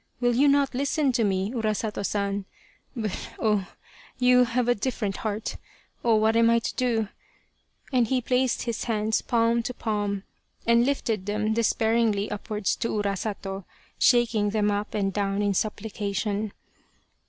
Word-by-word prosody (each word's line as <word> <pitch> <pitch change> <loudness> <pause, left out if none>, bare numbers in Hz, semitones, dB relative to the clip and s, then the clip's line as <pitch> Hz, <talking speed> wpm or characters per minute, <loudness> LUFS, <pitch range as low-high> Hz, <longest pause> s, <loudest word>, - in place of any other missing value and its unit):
Will 245 -1 +2
you 275 +5 +4
not 280 -1 +3
listen 280 +2 +1
to 235 -2 +1
me 195 0 0
Urasato 215 -3 -2
San? 200 -1 -1 0.5
but 220 -4 -2 0.3
oh! 210 -4 +1 0.5
you 250 0 +5
have 245 0 0
a 245 - +5
different 210 -3 -2
heart 215 0 -3 0.5
oh! 230 -2 +4
what 220 +1 +3
am 230 0 +5
I 230 - +5
to 230 - -3
do? 230 -5 0 0.4
" - - -30
and 245 -3 +3
he 260 +2 +1
placed 250 +1 +1
his 235 -2 -3
hands 220 -2 0
palm 235 -1 +2
to 245 +1 -5
palm 205 -3 -2 0.4
and 235 +1 +4
lifted 225 -8 -1
them 215 +1 0
despairingly 225 -2 +1
upwards 210 0 -2
to - - -1
Urasato, 200 -1 -3 0.3
shaking 230 -4 +3
them 210 0 +1
up 205 +2 -2
and 195 -2 0
down 200 0 0
in 205 -1 +2
supplication. 210 0 -2
220 Hz, 155 wpm, -26 LUFS, 205-235 Hz, 0.5 s, you